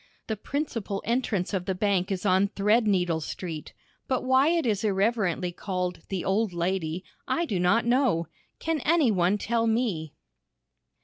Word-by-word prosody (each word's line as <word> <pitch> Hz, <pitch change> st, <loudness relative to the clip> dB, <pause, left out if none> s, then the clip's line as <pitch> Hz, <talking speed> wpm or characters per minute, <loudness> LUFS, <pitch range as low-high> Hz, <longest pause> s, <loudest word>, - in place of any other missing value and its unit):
The 220 Hz, -, -2 dB
principal 230 Hz, -5 st, -3 dB
entrance 225 Hz, -6 st, 0 dB
of 185 Hz, -2 st, -1 dB
the 190 Hz, -, -1 dB
bank 195 Hz, -1 st, +1 dB
is 190 Hz, +1 st, -2 dB
on 190 Hz, +1 st, +4 dB
Threadneedle 200 Hz, -5 st, +2 dB
Street, 160 Hz, 0 st, -6 dB, 0.4 s
but 260 Hz, -, 0 dB
why 260 Hz, +2 st, +4 dB
it 335 Hz, -2 st, +2 dB
is 210 Hz, -3 st, 0 dB
irreverently 195 Hz, -3 st, +1 dB
called 180 Hz, 0 st, -3 dB
"the 190 Hz, -3 st, -3 dB
Old 200 Hz, 0 st, +1 dB
Lady" 175 Hz, 0 st, -1 dB, 0.2 s
I 340 Hz, -, +1 dB
do 200 Hz, -, -2 dB
not 180 Hz, +7 st, +3 dB
know. 240 Hz, -9 st, +2 dB, 0.3 s
Can 325 Hz, -1 st, -1 dB
any 300 Hz, -3 st, +3 dB
one 185 Hz, +1 st, +2 dB
tell 230 Hz, +2 st, 0 dB
me? 220 Hz, -, -1 dB
200 Hz, 150 wpm, -27 LUFS, 180-235 Hz, 0.4 s, on